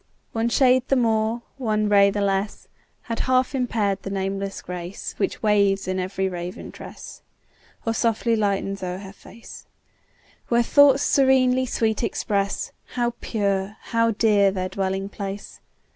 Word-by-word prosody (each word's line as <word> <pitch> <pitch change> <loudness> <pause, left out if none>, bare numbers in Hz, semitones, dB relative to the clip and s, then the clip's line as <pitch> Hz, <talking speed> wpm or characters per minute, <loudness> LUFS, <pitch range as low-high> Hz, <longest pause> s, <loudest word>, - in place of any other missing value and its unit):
One 225 +1 0
shade 255 0 +3
the 275 - +3
more, 225 -1 +1 0.2
one 215 -4 0
ray 200 -1 +5
the 205 +1 -2
less, 200 +1 -1 0.4
Had 230 -1 -4
half 255 +1 +2
impair'd 220 -7 0
the - - -6
nameless 195 0 -3
grace 180 +1 -6
Which 195 - -2
waves 200 -2 +2
in 185 0 -1
every 190 +1 -1
raven 180 0 -6
tress, - - -11 0.6
Or 225 - +1
softly 230 0 +1
lightens 200 -2 -1
o'er 180 -1 -3
her 195 0 -10
face; 225 +2 -13 0.8
Where 235 0 +3
thoughts 280 +2 +5
serenely 260 -1 +3
sweet 220 -2 0
express 200 -3 -1 0.2
How 240 -1 0
pure, 200 -1 -1
how 230 0 +1
dear 205 -2 +3
their 185 -1 -3
dwelling 195 0 -2
place. 200 0 -7
210 Hz, 145 wpm, -23 LUFS, 195-235 Hz, 0.8 s, ray